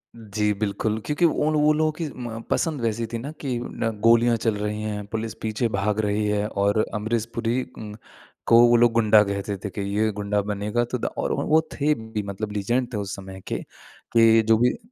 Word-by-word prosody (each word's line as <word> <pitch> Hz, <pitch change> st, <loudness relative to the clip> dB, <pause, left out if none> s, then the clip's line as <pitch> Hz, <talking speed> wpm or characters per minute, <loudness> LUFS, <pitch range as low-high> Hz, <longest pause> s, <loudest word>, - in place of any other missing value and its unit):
जी 105 Hz, -2 st, -1 dB
बिल्कुल 110 Hz, +1 st, -1 dB
क्योंकि 150 Hz, +4 st, +1 dB
उन 155 Hz, -1 st, +2 dB
वो 150 Hz, 0 st, +4 dB
लोगों 155 Hz, +1 st, +1 dB
की 155 Hz, +1 st, -4 dB
म 120 Hz, -3 st, -6 dB
पसंद 155 Hz, -5 st, 0 dB
वैसी 115 Hz, 0 st, -1 dB
थी -, -, 0 dB
ना 140 Hz, +6 st, -6 dB
कि 130 Hz, -4 st, -2 dB
न 115 Hz, -, -3 dB
गोलियाँ 115 Hz, +1 st, +5 dB
चल 115 Hz, -1 st, 0 dB
रही 105 Hz, +1 st, -3 dB
हैं 105 Hz, -1 st, -4 dB
पुलिस 110 Hz, +1 st, -4 dB
पीछे 110 Hz, +2 st, -1 dB
भाग 105 Hz, +1 st, -1 dB
रही 105 Hz, 0 st, 0 dB
है 105 Hz, 0 st, 0 dB
और 100 Hz, +1 st, +1 dB
अमरीश 110 Hz, +1 st, -1 dB
पुरी 115 Hz, +2 st, 0 dB, 0.2 s
उम, 105 Hz, -1 st, -7 dB, 0.5 s
को 115 Hz, -, +7 dB
वो 120 Hz, -, +5 dB
लोग 120 Hz, 0 st, +5 dB
गुंडा 110 Hz, -2 st, +5 dB
कहते 100 Hz, 0 st, -3 dB
थे -, -, -2 dB
कि 100 Hz, -, -5 dB, 0.2 s
ये 110 Hz, +1 st, +2 dB
गुंडा 105 Hz, 0 st, -1 dB
बनेगा 105 Hz, +3 st, -1 dB
तो 125 Hz, -, 0 dB
द -, -, -5 dB
और -, -, -1 dB
वो -, -, -1 dB
वो 160 Hz, +1 st, +5 dB
थे 150 Hz, +1 st, +2 dB
भी 110 Hz, -5 st, -5 dB
मतलब 100 Hz, +2 st, -5 dB
लीजेंड 120 Hz, +5 st, 0 dB
थे -, -, -1 dB
उस 100 Hz, -1 st, -4 dB
समय 95 Hz, -1 st, -10 dB
के -, -, -2 dB, 0.6 s
कि 115 Hz, -1 st, +6 dB
जो 110 Hz, 0 st, +5 dB
भी 125 Hz, +2 st, +2 dB
110 Hz, 215 wpm, -24 LUFS, 105-120 Hz, 0.6 s, को